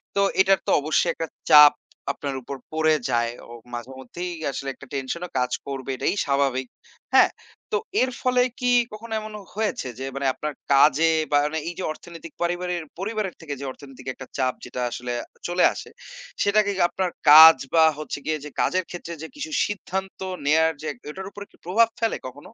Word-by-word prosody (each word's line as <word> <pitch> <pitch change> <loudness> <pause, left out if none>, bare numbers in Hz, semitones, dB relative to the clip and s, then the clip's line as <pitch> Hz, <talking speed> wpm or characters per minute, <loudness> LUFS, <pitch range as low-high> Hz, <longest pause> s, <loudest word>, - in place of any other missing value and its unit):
তো 200 - +3 0.2
এটার 195 -1 +4
তো - - 0
অবশ্যই 155 +3 +1
১ - - -9
টা 165 - -1 0.2
চাপ 150 -1 +10 0.4
আপনার 140 -2 -5
উপর 140 +3 -7 0.2
পড়ে 155 0 +3
যায়। 120 0 +1 0.2
অ - - -13 0.2
মাঝেমধ্যেই 130 +8 -6 0.2
আসলে 135 - -6
১ - - -13
টা 140 - -11
টেনশন 135 +6 -3
ও - - -25
কাজ 125 - 0 0.2
করবে 135 -1 -5
এটাই 195 - 0
স্বাভাবিক। 135 -2 0 0.5
হ্যাঁ? - - +6 0.4
তো 445 - +2 0.2
এর 255 - +2
ফলে 250 -1 +3 0.2
কি 250 0 +1 0.2
কখনো 225 +1 -8
এমন 215 0 -8 0.2
হয়েছে 215 -11 -2
যে, 135 - -4
মানে 140 -1 -1
আপনার 150 +2 -4 0.2
কাজে 150 +3 +5 0.2
বা 145 - +5
মানে 160 +1 -2
এই 175 - -6
যে - - -3
অর্থনৈতিক 165 0 -11
পারিবারের 175 0 -1 0.2
পরিবারের 210 -1 -3
থেকে 150 -3 -5
যে 140 - -6
অর্থনৈতিক 135 -2 -13
একটা 130 - -10
চাপ 130 -1 +1
যেটা 125 - -5
আসলে 125 0 -4 0.3
চলে 175 +1 +1
আসে, - - -9 0.5
সেটাকে 205 0 +3
কি 185 - -1
আপনার 185 -2 -1 0.2
কাজ 160 0 +11 0.2
বা 160 - +6 0.2
হচ্ছে 155 - -5
গিয়ে 155 0 0
যে - - -6
কাজের 185 +1 +1
ক্ষেত্রে 170 -1 -7
যে, 160 - -6
কিছু 300 +2 -6
সিদ্ধান্ত 190 -2 -5 0.3
নেওয়ার 160 +2 +4
যে, - - -8
এক 140 - -12
ওটার 190 +5 -7
উপর 205 - -8
কি - - -23
প্রভাব 225 +6 +4
ফেলে 225 -1 0
কখনো? 130 +2 -8
160 Hz, 190 wpm, -24 LUFS, 140-190 Hz, 0.5 s, কাজ